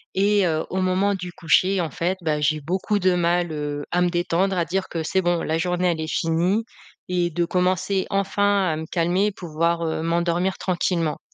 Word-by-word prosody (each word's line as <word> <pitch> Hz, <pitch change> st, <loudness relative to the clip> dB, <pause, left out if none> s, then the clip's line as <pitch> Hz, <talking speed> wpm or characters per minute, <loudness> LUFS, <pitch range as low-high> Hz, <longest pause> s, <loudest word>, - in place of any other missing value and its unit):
et 200 Hz, -1 st, +3 dB
heu, 160 Hz, -1 st, -1 dB
au 190 Hz, 0 st, 0 dB
moment 185 Hz, +2 st, +2 dB
du 180 Hz, -2 st, -5 dB
coucher, 185 Hz, +4 st, +2 dB
en 165 Hz, -4 st, -2 dB
fait, 180 Hz, +6 st, -1 dB
bah, 150 Hz, -2 st, 0 dB
j'ai 155 Hz, +1 st, +1 dB
beaucoup 185 Hz, +7 st, -1 dB
de 185 Hz, -1 st, +2 dB
mal, 175 Hz, -1 st, +1 dB
heu, 145 Hz, -1 st, -4 dB
à 180 Hz, -, +2 dB
me 180 Hz, -, +3 dB
détendre, 175 Hz, +2 st, 0 dB
à 170 Hz, -, +1 dB
dire 190 Hz, +3 st, -2 dB
que: 165 Hz, -2 st, -3 dB
«C'est 190 Hz, +4 st, +1 dB
bon 175 Hz, -1 st, 0 dB
la 160 Hz, +1 st, -1 dB
journée 180 Hz, +1 st, +1 dB
elle 160 Hz, -2 st, -3 dB
est 155 Hz, -, -3 dB
finie» 175 Hz, +7 st, +1 dB, 0.4 s
et 175 Hz, -1 st, 0 dB
de 170 Hz, +1 st, -1 dB
commencer 185 Hz, +2 st, 0 dB
enfin 200 Hz, 0 st, +1 dB
à -, -, -2 dB
me 160 Hz, -, -5 dB
calmer, 180 Hz, +5 st, +1 dB
pouvoir, 170 Hz, -2 st, -1 dB
heu, 160 Hz, 0 st, -2 dB
m'endormir 170 Hz, +2 st, 0 dB
tranquillement. 170 Hz, -3 st, -1 dB
175 Hz, 200 wpm, -23 LUFS, 165-190 Hz, 0.4 s, et